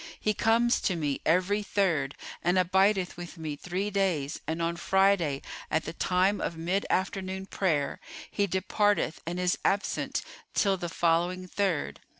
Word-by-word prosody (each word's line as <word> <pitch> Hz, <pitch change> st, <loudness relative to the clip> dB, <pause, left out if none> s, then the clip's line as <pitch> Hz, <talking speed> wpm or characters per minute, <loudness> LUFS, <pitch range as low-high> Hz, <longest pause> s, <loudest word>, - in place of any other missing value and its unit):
He 215 Hz, -, +1 dB
comes 230 Hz, +3 st, +3 dB
to 185 Hz, -, +1 dB
me 145 Hz, -4 st, -1 dB
every 185 Hz, +5 st, +2 dB
Third[FN#420] 170 Hz, -10 st, +1 dB, 0.3 s
and 175 Hz, +2 st, +2 dB
abideth 190 Hz, +1 st, +2 dB
with 175 Hz, 0 st, -8 dB
me 155 Hz, -2 st, -4 dB
three 185 Hz, +7 st, -3 dB
days 180 Hz, -8 st, 0 dB
and 160 Hz, +1 st, -2 dB
on 170 Hz, 0 st, 0 dB
Friday, 180 Hz, -5 st, +2 dB, 0.3 s
at 160 Hz, -, 0 dB
the -, -, -5 dB
time 185 Hz, +4 st, +1 dB
of 170 Hz, -, -3 dB
mid 180 Hz, +5 st, -1 dB
afternoon 190 Hz, 0 st, -1 dB
prayer, 155 Hz, -8 st, 0 dB, 0.3 s
he 200 Hz, -1 st, +1 dB
departeth 190 Hz, -1 st, +1 dB
and 175 Hz, +1 st, -2 dB
is 180 Hz, 0 st, +1 dB
absent 200 Hz, +1 st, 0 dB, 0.3 s
till 195 Hz, -2 st, +3 dB
the 175 Hz, -2 st, -4 dB
following 175 Hz, +2 st, +1 dB
Third. 185 Hz, -5 st, -1 dB
185 Hz, 155 wpm, -28 LUFS, 165-195 Hz, 0.3 s, comes